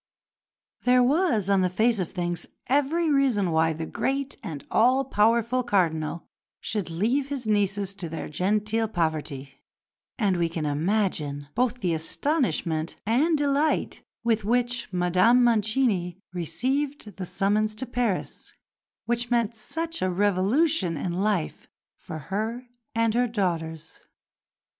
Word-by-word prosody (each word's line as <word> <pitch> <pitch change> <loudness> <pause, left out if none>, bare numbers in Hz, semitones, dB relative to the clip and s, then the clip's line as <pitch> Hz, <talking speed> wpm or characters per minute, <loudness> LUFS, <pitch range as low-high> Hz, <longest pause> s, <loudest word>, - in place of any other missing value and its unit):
There 250 0 +5
was, 260 - +2
on 195 -1 +3
the 185 - +2
face 220 +4 +2
of 180 - -2
things, 175 -2 -3 0.2
every 295 +4 +1
reason 250 -10 +2
why 160 0 +3
the 160 +1 -4
great 275 - -2
and 145 -4 -7
all 255 +4 +4
powerful 235 +1 +2
Cardinal 170 -8 0 0.3
should 205 -6 -3
leave 230 +12 0
his 275 -4 -4
nieces 200 -2 +1
to 185 -4 -5
their 160 - -5
genteel 210 +7 0
poverty; 155 -7 -3 0.6
and 200 -6 +1
we 170 -1 +1
can 160 -2 -3
imagine 150 -3 -1
both 250 0 0
the 180 -4 +1
astonishment 165 - 0
and 290 +9 +3
delight 290 +1 +1 0.2
with 225 -2 +1
which 240 +1 0
Madame 185 +7 +4
Mancini 215 -5 +1 0.2
received 245 - -2
the 190 - -4
summons 215 +3 0
to 260 - -4
Paris 240 -6 -2 0.5
which 240 0 -1
meant 235 -2 +1
such 330 +9 -4
a 185 - +1
revolution 200 - +2
in 175 +4 -3
life 190 -2 -1 0.3
for 155 - -8
her 220 - -3 0.3
and 230 -1 +2
her 245 +1 +2
daughters. 165 -7 -3
210 Hz, 130 wpm, -26 LUFS, 175-245 Hz, 0.6 s, There